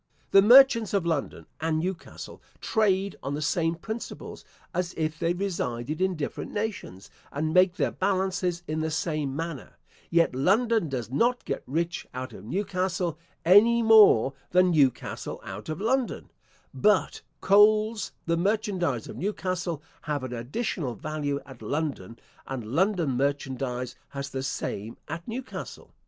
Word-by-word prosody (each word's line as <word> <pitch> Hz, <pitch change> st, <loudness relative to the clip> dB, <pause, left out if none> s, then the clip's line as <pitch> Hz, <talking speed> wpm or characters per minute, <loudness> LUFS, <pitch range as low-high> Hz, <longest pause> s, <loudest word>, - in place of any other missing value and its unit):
The 195 Hz, -, +8 dB
merchants 230 Hz, -1 st, +7 dB
of 190 Hz, -4 st, +1 dB
London 160 Hz, -4 st, -2 dB
and 160 Hz, 0 st, 0 dB
Newcastle 175 Hz, +2 st, -5 dB, 0.2 s
trade 200 Hz, -3 st, +1 dB
on 140 Hz, +2 st, -3 dB
the 150 Hz, -, -4 dB
same 165 Hz, +3 st, +1 dB
principles, 220 Hz, +7 st, -7 dB, 0.3 s
as 180 Hz, 0 st, -2 dB
if 160 Hz, 0 st, -2 dB
they 170 Hz, 0 st, +1 dB
resided 155 Hz, -7 st, -3 dB
in 190 Hz, -1 st, +1 dB
different 150 Hz, -3 st, -5 dB
nations, 205 Hz, -, -5 dB, 0.2 s
and 155 Hz, +2 st, -2 dB
make 180 Hz, 0 st, +5 dB
their -, -, 0 dB
balances 185 Hz, -2 st, -1 dB
in 155 Hz, +1 st, -2 dB
the 160 Hz, 0 st, -1 dB
same 155 Hz, -3 st, -2 dB
manner: 165 Hz, -3 st, -6 dB, 0.3 s
yet 170 Hz, -3 st, +3 dB
London 205 Hz, -, +2 dB
does 125 Hz, -3 st, -4 dB
not 240 Hz, -, +1 dB
get -, -, -3 dB
rich 165 Hz, +4 st, -2 dB
out 130 Hz, -1 st, -5 dB
of 105 Hz, -, -11 dB
Newcastle, 185 Hz, -, -2 dB, 0.3 s
any 225 Hz, +6 st, +6 dB
more 210 Hz, -, +7 dB, 0.2 s
than 180 Hz, 0 st, +4 dB
Newcastle 140 Hz, -6 st, 0 dB
out -, -, -8 dB
of 155 Hz, -, -3 dB
London: 245 Hz, +4 st, -1 dB, 0.4 s
but 210 Hz, -1 st, +2 dB, 0.2 s
coals, 215 Hz, +2 st, +4 dB
the 170 Hz, 0 st, +1 dB
merchandize 185 Hz, -, 0 dB
of -, -, -8 dB
Newcastle, 180 Hz, -5 st, -3 dB, 0.2 s
have 150 Hz, -3 st, -3 dB
an 130 Hz, -1 st, -5 dB
additional 130 Hz, -, -3 dB
value 145 Hz, +2 st, -3 dB
at 130 Hz, -4 st, -13 dB
London, 125 Hz, -4 st, -3 dB, 0.3 s
and 130 Hz, -4 st, -5 dB
London 180 Hz, -3 st, +2 dB
merchandize 130 Hz, -2 st, -2 dB
has 140 Hz, 0 st, -6 dB
the 135 Hz, -, -3 dB
same 115 Hz, -4 st, -4 dB
at 165 Hz, +2 st, -6 dB
Newcastle. 250 Hz, +3 st, -7 dB
170 Hz, 145 wpm, -27 LUFS, 140-200 Hz, 0.4 s, The